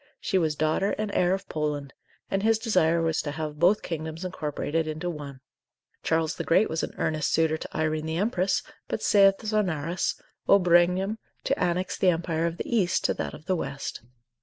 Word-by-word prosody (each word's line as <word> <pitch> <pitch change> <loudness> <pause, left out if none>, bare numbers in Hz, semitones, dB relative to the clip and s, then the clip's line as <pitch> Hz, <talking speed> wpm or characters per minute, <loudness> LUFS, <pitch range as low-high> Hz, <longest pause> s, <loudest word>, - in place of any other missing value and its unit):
she 190 - +1
was 155 -3 0
daughter 155 +6 +1
and 215 -1 -2
heir 180 0 +3
of 190 0 -2
Poland, 150 -2 -3 0.4
and 195 - +1
his 225 +1 +3
desire 170 -7 +2
was 160 -1 +1
to 145 - -4
have 150 0 -5
both 185 +6 +4
kingdoms 160 +1 -5
incorporated 160 -2 -2
into 160 +3 -3
one. 140 -4 -8 0.6
Charles 160 0 +1
the 165 - -4
Great 185 +6 +3
was 160 - -1
an - - -5
earnest 155 -1 0
suitor 160 -1 +2
to - - -7
Irene 155 0 0
the 160 +1 -2
Empress, 195 -1 +1 0.2
but, - - -3
saith 195 -1 +5
Zonarus, 180 -6 -1 0.3
ob 200 -2 +6
regnum, 180 +5 +3 0.2
to 275 - 0
annex 180 +1 -1
the 185 - +4
empire 165 -1 0
of 170 0 -4
the - - -4
East 185 -5 +2
to - - +3
that - - -4
of 155 - -14
the 185 - +1
West. 140 -4 -4
170 Hz, 190 wpm, -27 LUFS, 155-190 Hz, 0.6 s, ob